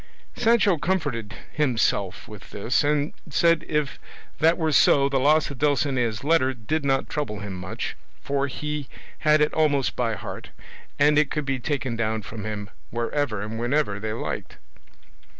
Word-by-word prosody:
Sancho 220 Hz, -7 st, +3 dB
comforted 145 Hz, -, -1 dB, 0.2 s
himself 110 Hz, -9 st, 0 dB
with 105 Hz, -3 st, -11 dB
this, 115 Hz, +8 st, 0 dB
and 145 Hz, +1 st, +1 dB, 0.2 s
said 165 Hz, +2 st, +3 dB
if 150 Hz, -2 st, -1 dB, 0.4 s
that 165 Hz, +2 st, +4 dB
were 160 Hz, -2 st, 0 dB
so 140 Hz, -1 st, +5 dB
the 140 Hz, -1 st, +1 dB
loss 150 Hz, +3 st, +3 dB
of 135 Hz, -, -9 dB
Dulcinea's 135 Hz, -7 st, +1 dB
letter 140 Hz, -4 st, +3 dB
did 145 Hz, +7 st, -2 dB
not 135 Hz, -1 st, +1 dB
trouble 105 Hz, -9 st, -3 dB
him 100 Hz, -1 st, -5 dB
much, 95 Hz, 0 st, -5 dB, 0.2 s
for 140 Hz, 0 st, -1 dB
he 150 Hz, 0 st, -4 dB, 0.3 s
had 155 Hz, 0 st, +4 dB
it 150 Hz, -, +2 dB
almost 145 Hz, -4 st, +2 dB
by 115 Hz, -3 st, 0 dB
heart, -, -, -7 dB, 0.5 s
and 150 Hz, +1 st, +5 dB
it 150 Hz, -2 st, +2 dB
could 150 Hz, -2 st, -2 dB
be 135 Hz, -1 st, -1 dB
taken 130 Hz, -2 st, -2 dB
down 110 Hz, -1 st, -1 dB
from 110 Hz, +1 st, -7 dB
him 105 Hz, -2 st, -5 dB, 0.2 s
wherever 120 Hz, -2 st, -1 dB
and 110 Hz, +2 st, -5 dB
whenever 120 Hz, -4 st, 0 dB
they 110 Hz, +1 st, -3 dB
liked. 115 Hz, -, -5 dB
140 Hz, 160 wpm, -25 LUFS, 115-150 Hz, 0.5 s, so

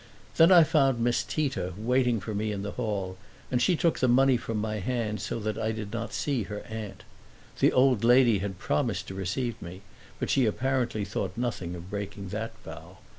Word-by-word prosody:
Then 165 Hz, +3 st, +7 dB
I 175 Hz, -3 st, +9 dB
found 135 Hz, -5 st, +2 dB
Miss 120 Hz, +1 st, +2 dB
Tita 135 Hz, -, -2 dB
waiting 125 Hz, +1 st, +1 dB
for 105 Hz, +3 st, -5 dB
me 105 Hz, +1 st, -1 dB
in 100 Hz, -1 st, -4 dB
the 100 Hz, -, -4 dB
hall, 100 Hz, -6 st, -3 dB, 0.3 s
and 125 Hz, -1 st, +1 dB
she 180 Hz, -, +3 dB
took 165 Hz, 0 st, +1 dB
the 130 Hz, -, +3 dB
money 130 Hz, +2 st, +5 dB
from 115 Hz, -2 st, -3 dB
my 110 Hz, 0 st, -2 dB
hand 110 Hz, -1 st, -2 dB
so 105 Hz, -, -3 dB
that 110 Hz, 0 st, -3 dB
I 110 Hz, -, 0 dB
did 110 Hz, -1 st, -6 dB
not 115 Hz, 0 st, -4 dB
see 140 Hz, -5 st, -1 dB
her 105 Hz, 0 st, -6 dB
aunt. 110 Hz, -3 st, -7 dB, 0.6 s
The -, -, +5 dB
old 125 Hz, -4 st, +3 dB
lady 120 Hz, -3 st, +5 dB
had 95 Hz, -1 st, -4 dB
promised 75 Hz, -5 st, -1 dB
to -, -, -6 dB
receive 100 Hz, +6 st, -3 dB
me, 90 Hz, +3 st, -8 dB, 0.4 s
but -, -, -1 dB
she 130 Hz, -4 st, +3 dB
apparently 120 Hz, -2 st, -1 dB
thought 100 Hz, -1 st, -4 dB
nothing 105 Hz, -8 st, -3 dB
of 90 Hz, +2 st, -10 dB
breaking 100 Hz, -1 st, -5 dB
that 110 Hz, +3 st, -4 dB
vow. -, -, -10 dB
110 Hz, 200 wpm, -28 LUFS, 100-125 Hz, 0.6 s, I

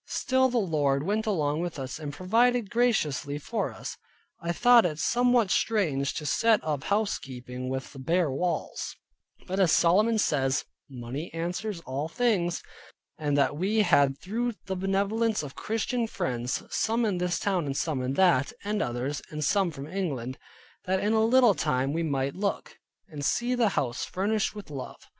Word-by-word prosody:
Still 260 Hz, 0 st, +2 dB
the 245 Hz, -, 0 dB
Lord 145 Hz, -9 st, +1 dB
went 215 Hz, +5 st, -1 dB
along 155 Hz, -6 st, 0 dB
with 175 Hz, -2 st, -4 dB
us, 135 Hz, +2 st, -5 dB
and 150 Hz, -2 st, -5 dB
provided 225 Hz, -, +2 dB
graciously 155 Hz, -, +1 dB
for 220 Hz, +10 st, -2 dB
us. -, -, -7 dB, 0.4 s
I 170 Hz, -1 st, -1 dB
thought 240 Hz, +6 st, +6 dB
it 155 Hz, -4 st, -1 dB
somewhat 240 Hz, +4 st, +2 dB
strange 155 Hz, -12 st, +1 dB
to 150 Hz, -, -4 dB
set 225 Hz, +6 st, +3 dB
up 150 Hz, -3 st, -2 dB
house 210 Hz, +1 st, +1 dB
keeping 125 Hz, -1 st, -7 dB
with 130 Hz, +2 st, -5 dB
bare 165 Hz, 0 st, +2 dB
walls; 175 Hz, +6 st, -2 dB, 0.5 s
but 190 Hz, +1 st, -3 dB
as 185 Hz, -5 st, +4 dB
Solomon 210 Hz, +7 st, +4 dB
says, 135 Hz, -9 st, +1 dB, 0.2 s
"Money 130 Hz, +5 st, -6 dB
answers 175 Hz, +3 st, -3 dB
all 140 Hz, 0 st, -3 dB
things" 180 Hz, -4 st, 0 dB, 0.6 s
and 145 Hz, -2 st, 0 dB
that 140 Hz, 0 st, +2 dB
we 205 Hz, +7 st, +2 dB
had 140 Hz, -6 st, +3 dB
through 235 Hz, +8 st, -2 dB
the 190 Hz, -, -3 dB
benevolence 200 Hz, +3 st, 0 dB
of 140 Hz, -2 st, -7 dB
Christian 225 Hz, +2 st, -1 dB
friends, 125 Hz, -, -2 dB
some 230 Hz, +1 st, +1 dB
in 195 Hz, -5 st, 0 dB
this 180 Hz, 0 st, 0 dB
town, 185 Hz, -6 st, 0 dB
and 135 Hz, 0 st, -2 dB
some 155 Hz, -6 st, -1 dB
in 130 Hz, +1 st, -1 dB
that, 165 Hz, -5 st, +3 dB
and 210 Hz, +1 st, -1 dB
others; 125 Hz, +4 st, -2 dB
and 150 Hz, 0 st, -4 dB
some 195 Hz, +2 st, +2 dB
from 140 Hz, -4 st, -7 dB
England; 145 Hz, -8 st, -3 dB, 0.5 s
that 190 Hz, +1 st, +1 dB
in 210 Hz, +3 st, +1 dB
a 220 Hz, 0 st, +3 dB
little 240 Hz, -1 st, +5 dB
time 135 Hz, -4 st, 0 dB
we 165 Hz, -, 0 dB
might 140 Hz, -4 st, -1 dB
look, 200 Hz, +1 st, -3 dB, 0.3 s
and 145 Hz, -2 st, -7 dB
see 240 Hz, -, +1 dB
the 240 Hz, -4 st, +3 dB
house 125 Hz, -2 st, -1 dB
furnished 210 Hz, +3 st, -1 dB
with 205 Hz, -7 st, -9 dB
love. 135 Hz, -3 st, -8 dB
175 Hz, 170 wpm, -27 LUFS, 140-215 Hz, 0.6 s, thought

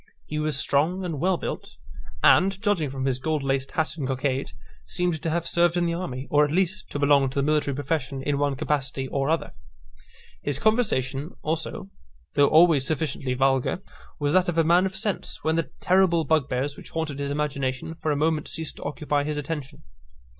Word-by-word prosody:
He 150 Hz, -, -4 dB
was 155 Hz, -2 st, 0 dB
strong 160 Hz, +8 st, +1 dB
and 160 Hz, -5 st, -3 dB
well 185 Hz, +3 st, +2 dB
built; -, -, -6 dB, 0.5 s
and, 195 Hz, +1 st, +5 dB
judging 195 Hz, -8 st, +1 dB
from 135 Hz, 0 st, -4 dB
his 130 Hz, -2 st, +1 dB
gold 155 Hz, +1 st, -1 dB
laced 135 Hz, 0 st, -1 dB
hat 160 Hz, 0 st, -1 dB
and 140 Hz, -4 st, -2 dB
cockade, 130 Hz, 0 st, -1 dB, 0.3 s
seemed 175 Hz, -4 st, -2 dB
to 165 Hz, -, -1 dB
have 170 Hz, +1 st, -1 dB
served 175 Hz, 0 st, +3 dB
in 175 Hz, -, +2 dB
the 170 Hz, -, 0 dB
army, 135 Hz, -7 st, -4 dB
or, 150 Hz, 0 st, +5 dB
at 145 Hz, -, +1 dB
least, 190 Hz, +5 st, 0 dB
to -, -, -4 dB
belong 140 Hz, -1 st, +4 dB
to 130 Hz, -, -11 dB
the 140 Hz, -, +1 dB
military 150 Hz, -2 st, +1 dB
profession 140 Hz, -1 st, -2 dB
in 140 Hz, 0 st, 0 dB
one 145 Hz, -1 st, +1 dB
capacity 135 Hz, -2 st, -1 dB
or 135 Hz, +1 st, -1 dB
other. 165 Hz, -, -1 dB, 0.9 s
His -, -, -1 dB
conversation 160 Hz, -, 0 dB
also, 165 Hz, +5 st, -3 dB, 0.4 s
though 145 Hz, -, +5 dB
always 160 Hz, -3 st, +6 dB
sufficiently 145 Hz, -5 st, -1 dB
vulgar, 135 Hz, +7 st, +1 dB, 0.3 s
was 145 Hz, 0 st, 0 dB
that 185 Hz, -1 st, +4 dB
of 170 Hz, -, -2 dB
a 165 Hz, -, +5 dB
man 175 Hz, +4 st, +4 dB
of 190 Hz, -, -8 dB
sense, 205 Hz, -1 st, -2 dB
when 160 Hz, 0 st, +1 dB
the 165 Hz, -1 st, -1 dB
terrible 180 Hz, -3 st, +3 dB
bugbears 140 Hz, -2 st, 0 dB
which -, -, -12 dB
haunted 160 Hz, -4 st, -3 dB
his 140 Hz, 0 st, -2 dB
imagination 140 Hz, -1 st, -2 dB
for 160 Hz, -1 st, -2 dB
a -, -, +1 dB
moment 155 Hz, 0 st, 0 dB
ceased 160 Hz, -2 st, -4 dB
to -, -, -8 dB
occupy 145 Hz, -1 st, -1 dB
his 150 Hz, 0 st, -3 dB
attention. 145 Hz, -1 st, -5 dB
150 Hz, 195 wpm, -25 LUFS, 140-170 Hz, 0.9 s, always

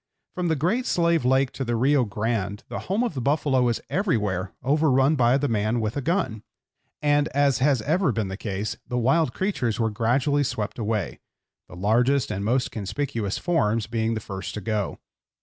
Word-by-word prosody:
From 180 Hz, -1 st, -2 dB
the 160 Hz, -, +2 dB
Great 195 Hz, -, 0 dB
Slave 170 Hz, -3 st, +2 dB
Lake 130 Hz, +1 st, +3 dB
to 135 Hz, -, -4 dB
the 120 Hz, -2 st, -1 dB
Rio 130 Hz, +2 st, +3 dB
Grande 105 Hz, 0 st, -2 dB
the -, -, -4 dB
home 205 Hz, +6 st, +1 dB
of 240 Hz, -, -1 dB
the 130 Hz, -, -3 dB
buffalo 140 Hz, -1 st, +2 dB
was 120 Hz, -2 st, +1 dB
everywhere 105 Hz, -, -1 dB
overrun 140 Hz, 0 st, +3 dB
by 125 Hz, -1 st, +4 dB
the 145 Hz, +1 st, 0 dB
man 110 Hz, 0 st, 0 dB
with 110 Hz, -1 st, -2 dB
a 145 Hz, -, -1 dB
gun; 130 Hz, -, -1 dB, 0.6 s
and, 145 Hz, 0 st, +3 dB
as 140 Hz, -3 st, +3 dB
has 135 Hz, -4 st, +2 dB
ever 160 Hz, -, +2 dB
been 110 Hz, -3 st, -1 dB
the 95 Hz, -, -5 dB
case, 100 Hz, 0 st, -3 dB
the 125 Hz, -, -2 dB
wild 135 Hz, +4 st, +2 dB
creatures 125 Hz, -, -1 dB
were 110 Hz, -1 st, +1 dB
gradually 130 Hz, +6 st, +1 dB
swept 110 Hz, -3 st, -3 dB
away, 105 Hz, -, -2 dB, 0.5 s
the -, -, -11 dB
largest 120 Hz, +7 st, +2 dB
and 100 Hz, -1 st, -3 dB
most 125 Hz, +4 st, +1 dB
conspicuous 110 Hz, 0 st, -3 dB
forms 115 Hz, -, +1 dB
being 115 Hz, 0 st, -1 dB
the -, -, -2 dB
first 95 Hz, -2 st, -6 dB
to 105 Hz, -, -4 dB
go. 105 Hz, 0 st, -2 dB
125 Hz, 185 wpm, -25 LUFS, 110-145 Hz, 0.6 s, by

